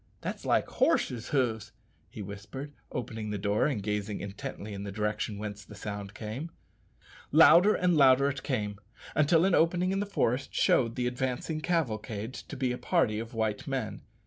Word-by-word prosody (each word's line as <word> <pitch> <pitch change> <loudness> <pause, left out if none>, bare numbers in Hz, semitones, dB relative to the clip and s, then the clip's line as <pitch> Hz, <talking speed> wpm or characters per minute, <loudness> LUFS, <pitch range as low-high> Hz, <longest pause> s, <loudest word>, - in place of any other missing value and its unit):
that's - - -5
like - - +2
horses' 120 -2 +1
hoofs," 115 -6 0 0.4
he 105 - -7
whispered, 100 +9 -8 0.2
opening 110 -3 -4
the 105 - -2
door 100 +5 +1
and 120 -9 -2
gazing 105 0 -2
intently 100 +1 -6
in 100 - -5
the 100 - -5
direction 105 +1 -2
whence 105 0 -6
the 105 - -12
sound 100 -1 -6
came. 115 +9 -5 0.8
Louder 170 +6 +7
and 180 -1 +2
louder 135 -1 +6
it 135 -1 -2
came, 105 -7 -2 0.3
until 160 +3 +4
an 190 - +2
opening 175 +3 +3
in 195 - 0
the 205 - -2
forest 130 - 0
showed 115 -2 +3
the 125 - -1
advancing 130 +5 -2
cavalcade 115 -9 -2
to - - -8
be 130 -1 0
a 125 - -4
party 105 -1 +1
of 115 +1 -7
white 110 -2 -1
men. - - -3
115 Hz, 170 wpm, -29 LUFS, 105-140 Hz, 0.8 s, Louder